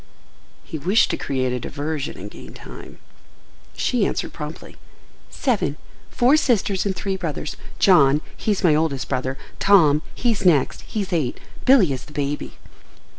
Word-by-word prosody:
He 160 -5 -6
wished 190 +10 +3
to - - 0
create 130 -2 -1
a 125 - -2
diversion 145 +3 -4
and - - -8
gain - - -12
time. - - -11 0.8
She 245 -4 +1
answered - - -3
promptly. 150 +1 -8 0.5
"Seven: 215 - -1 0.3
four 255 +5 +4
sisters 205 -8 +1
and 190 - -1
three 195 +1 -2
brothers. 155 -6 -4 0.2
John, 150 -6 +5
he's 205 -3 -1
my 170 -4 +5
oldest 150 -4 0
brother; 130 0 -2 0.2
Tom, 155 -7 +5
he's 230 -5 0
next—he's 185 - +1
eight. 150 -8 -1 0.3
Billy 235 - +5
is 130 -1 -6
the 150 - -15
baby." 145 0 -3
160 Hz, 140 wpm, -22 LUFS, 140-200 Hz, 0.8 s, John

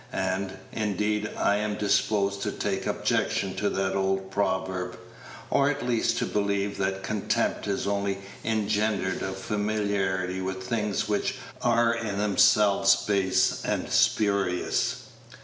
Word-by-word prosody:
And, 95 0 -2
indeed, 105 0 -1
I 100 - +2
am 105 0 -1
disposed 100 -1 +1
to - - -1
take - - -2
objection - - 0
to - - +1
that 95 0 -1
old 95 0 0
proverb, 95 -2 -1 0.5
or 140 0 +4
at 145 0 -2
least 120 -2 +1
to - - 0
believe 100 -1 -1
that 95 0 -1
contempt 105 +1 -1
is 100 -1 -1
only 100 -1 -1 0.3
engendered 105 -3 0
of 95 0 -3
familiarity 100 -3 -1
with 95 0 -4
things 105 0 -1
which - - 0 0.3
are 115 -1 +3
in 110 -4 -3
themselves 100 -1 +4
base 100 -2 +1
and - - -2
spurious. 100 -4 +1
100 Hz, 130 wpm, -27 LUFS, 95-105 Hz, 0.5 s, or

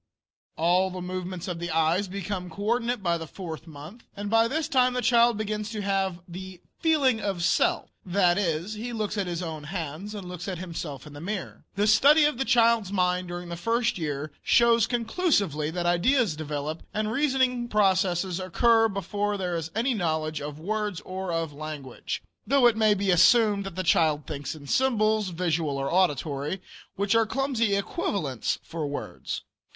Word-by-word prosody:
All 180 +3 +3
the 185 0 -6
movements 180 0 -5
of 175 -2 -4
the 175 0 -4
eyes 165 +5 +2
become 185 -1 -4
co 200 +5 -7
ordinate 235 0 0
by 170 -2 +1
the 160 - -6
fourth 165 -1 -8
month, 160 +9 -11
and 205 +1 -4
by 225 0 +5
this 310 +5 -1
time 255 -5 +3
the 250 - -1
child 235 -1 +4
begins 210 0 -3
to 215 -2 -4
have 195 -3 -1
the 185 +1 -8 0.2
"feeling 280 -8 +3
of 195 -4 -2
self," - - +1
that 180 -1 +3
is, 170 +1 -1
he 235 +3 -5
looks 215 -2 -2
at 200 -3 -1
his 175 0 -3
own 160 -3 -6
hands 170 +4 -5
and 195 -3 -7
looks 180 0 -7
at 185 -2 -3
himself 165 -6 -6
in 150 - -11
the 145 - -9
mirror. 195 +2 -5
The 205 +1 +2
study 285 +9 +6
of 295 -4 0
the 270 - +1
child's 230 -5 +3
mind 180 -2 +1
during 175 0 -6
the 170 - -4
first 230 +4 0
year 150 -1 -3
shows 235 -1 +4
conclusively 225 - 0
that 175 +1 -3
ideas 185 - +2
develop 150 +1 -4
and 215 0 0
reasoning 260 -2 +1
processes 190 -4 +1
occur 225 +5 +3
before 205 +1 -2
there 180 -2 -2
is 165 -1 -3
any 245 +4 +1
knowledge 155 -6 -1
of 145 0 -6
words 210 +1 -2
or 185 -1 -5
of 165 -2 -2
language; 145 -3 -6 0.2
though 275 +1 +4
it 235 -2 +6
may 215 -1 +4
be 195 -1 +1
assumed 205 +2 +4
that 190 - -8
the 185 - -2
child 155 -3 +2
thinks 145 0 -5
in 145 -2 -12
symbols, 215 - +2
visual 165 -4 -1
or 135 +3 -2
auditory, 150 -2 0 0.4
which 200 +2 +1
are 225 -1 +3
clumsy 245 -5 0
equivalents 195 - -2
for 160 -3 -4
words. 145 - -5
190 Hz, 180 wpm, -26 LUFS, 165-220 Hz, 0.4 s, study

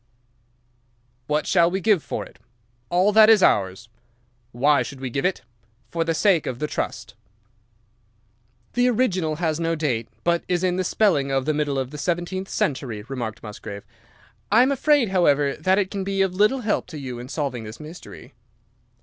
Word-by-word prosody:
"'What 150 +1 0
shall 170 -2 +4
we 190 +2 -2
give 200 -3 +3
for - - -5
it?' - - -18 0.5
"'All 185 +4 +3
that 215 +1 +7
is 215 -4 +6
ours.' 95 +3 +2 0.6
"'Why 140 +3 +3
should 130 +2 -6
we 130 -2 -5
give 135 +6 -2
it?' 185 -8 -1 0.5
"'For 165 - 0
the 165 0 -1
sake 185 -3 +2
of 125 - -3
the 150 - -2
trust.' - - -4 1.6
"'The 245 +1 +3
original 190 -10 0
has 160 -1 -1
no 165 0 0
date, 125 -8 -1 0.2
but 170 0 +1
is 180 0 0
in 180 -1 +1
the 185 - 0
spelling 175 -8 +2
of 135 -1 0
the 155 - +1
middle 145 -2 -1
of 130 -1 -3
the 150 - -8
seventeenth 175 +4 -2
century,' 125 -7 -2
remarked 120 -5 -5
Musgrave. 105 -1 -8 0.7
'I 225 +4 +6
am 265 - +2
afraid, 280 -3 +3
however, 145 -7 +2
that 185 +5 +1
it 200 -1 0
can 200 -2 -3
be 195 0 0
of 190 -2 -1
little 215 +7 +2
help 220 -2 -1
to 160 - -8
you 130 -4 -6
in 125 +1 -9
solving 140 -6 -3
this 110 +1 -9
mystery. 150 -4 -11
165 Hz, 180 wpm, -23 LUFS, 135-190 Hz, 1.6 s, that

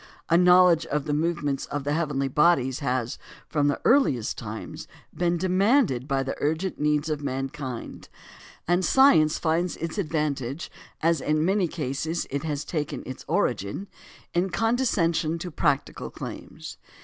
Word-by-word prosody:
A 165 - +4
knowledge 180 -1 +5
of 150 -1 -1
the 150 - -1
movements 150 -3 -1
of 145 -1 -4
the 145 +1 -1
heavenly 145 -4 0
bodies 135 -3 +2
has, 125 -4 -2 0.3
from 145 -2 +1
the 145 - 0
earliest 230 - +3
times, - - -7 0.3
been 175 0 +1
demanded 185 - +2
by 135 -2 0
the 135 - -3
urgent 160 +6 -1
needs 150 +1 +1
of 155 -2 -2
mankind; 135 -2 -5 0.6
and 175 +2 +2
science 175 - +5
finds 170 +2 0
its 165 +4 -4
advantage, 150 -4 -2 0.3
as 165 -3 +2
in 155 +1 +1
many 190 0 +2
cases 155 +2 -3
it 140 0 -1
has 150 -2 -3
taken 150 -3 -3
its 130 - -7
origin, 100 - -1 0.5
in 180 +2 +1
condescension 180 -8 +1
to 175 +1 -6
practical 145 -2 -1
claims. - - -8
155 Hz, 145 wpm, -26 LUFS, 140-175 Hz, 0.6 s, knowledge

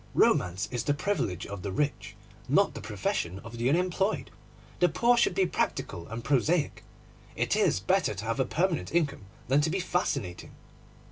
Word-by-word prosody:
Romance 90 +1 +3
is 120 -3 -2
the 145 - +1
privilege 135 - -1
of 100 -2 -7
the 100 - -4
rich, 145 +9 -2 0.3
not - - +4
the - - -7
profession 90 +2 -2
of 115 +1 -9
the 120 +2 +2
unemployed. 185 +6 0 0.5
The 180 - +5
poor 240 +8 +3
should 235 -6 +2
be 190 - +3
practical 85 - -2
and 115 +1 -6
prosaic. 145 +4 +1 0.5
It - - +1
is - - +3
better - - +1
to 105 +4 -6
have 115 +4 -1
a 130 - +3
permanent 170 +3 -1
income 145 - 0 0.2
than 135 +3 +4
to 155 - +1
be 190 +4 -1
fascinating. 175 - -2
140 Hz, 175 wpm, -29 LUFS, 105-180 Hz, 0.5 s, The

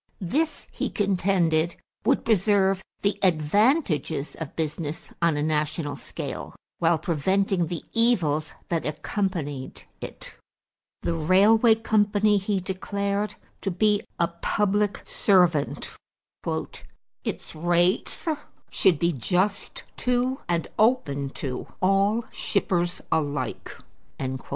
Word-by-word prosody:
This, 300 - -1
he - - -2
contended, 180 -5 +1 0.3
would - - +2
preserve 195 -2 +3 0.2
the 200 0 +1
advantages 180 - +2
of 160 -4 -7
business 160 0 -4
on 170 -3 +3
a 145 - 0
national 150 0 -1
scale - - -6 0.2
while 165 0 +3
preventing 175 +3 +1
the 170 0 -4
evils 170 -11 +2 0.2
that 165 -2 0
accompanied 150 -4 -3 0.2
it. - - -6 0.7
The - - 0
railway 205 +8 +5
company 210 -2 +3
he 195 0 0
declared 200 +2 -2 0.3
to 195 - -1
be 205 +3 +2 0.2
a 170 - +4
public 205 +4 0
servant. 180 -7 +2 1.3
"Its - - -4
rates 175 - +1 0.4
should 180 -5 +4
be 170 +3 +2
just 185 - 0
to 250 +1 +1
and 170 -1 0
open 155 - +2 0.2
to 130 -2 -4
all 200 +4 +2
shippers 175 -3 0
alike." 145 -2 -1
185 Hz, 105 wpm, -25 LUFS, 160-205 Hz, 1.3 s, railway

